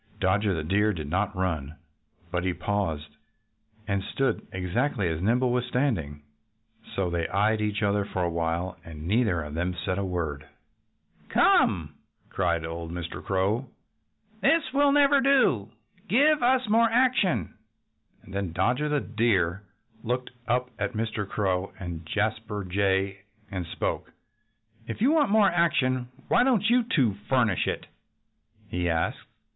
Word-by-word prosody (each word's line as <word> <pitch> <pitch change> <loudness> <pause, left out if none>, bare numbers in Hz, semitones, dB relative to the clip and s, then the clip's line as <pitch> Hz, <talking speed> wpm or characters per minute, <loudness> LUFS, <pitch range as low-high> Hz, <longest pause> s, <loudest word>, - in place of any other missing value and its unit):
Dodger 95 +1 +2
the 80 - -3
Deer 105 +6 +2
did 80 -5 -5
not 100 +2 0
run. 80 -6 -2 0.6
But 90 -1 -1
he 90 -1 -1
paused 80 -8 -2 0.7
and 100 -2 0
stood 135 +1 -1
exactly 95 +4 -1
as 80 0 -3
Nimble 120 +5 +2
was 125 0 +1
standing. 100 - -1 0.7
So 95 -3 0
they 85 -1 -1
eyed 105 +2 +1
each 105 0 -1
other 100 0 +2
for 95 -2 -3
a 85 - +1
while. 85 +2 -2
And 80 -1 -9
neither 105 -5 +2
of 75 0 -8
them 90 +3 -2
said 90 +2 -2
a - - -1
word. 80 -6 -3 0.8
"Come!" 75 -4 +3 0.4
cried 85 -3 0
old 85 0 -5
Mr. 85 -1 -6
Crow. 100 +7 0 0.7
"This 330 -1 +4
will 285 0 +4
never 285 -1 +5
do. 255 - +3 0.4
Give 290 +5 +4
us 255 0 +3
more 230 +2 +4
action!" 230 - +2 0.7
And 95 - -13
then 100 -4 -3
Dodger 125 - +1
the 150 -1 +1
Deer 100 -5 +1 0.4
looked 125 +2 -2 0.2
up 125 +1 0
at 105 -1 -2
Mr. 110 -2 -3
Crow 95 -2 -1
and 85 -3 -6
Jasper 105 +2 -2
Jay 95 +1 0 0.3
and 90 -3 -4
spoke. - - -3 0.8
"If 115 - -5
you 250 +7 +4
want 310 -7 +3
more 205 -2 +5
action 130 -7 +1 0.2
why - - +4
don't 230 -4 +2
you 250 +1 +5
two 130 - +3 0.2
furnish 120 -8 +2
it?" - - -2 0.8
he 90 0 -1
asked. 80 -1 0
100 Hz, 145 wpm, -27 LUFS, 90-130 Hz, 0.8 s, never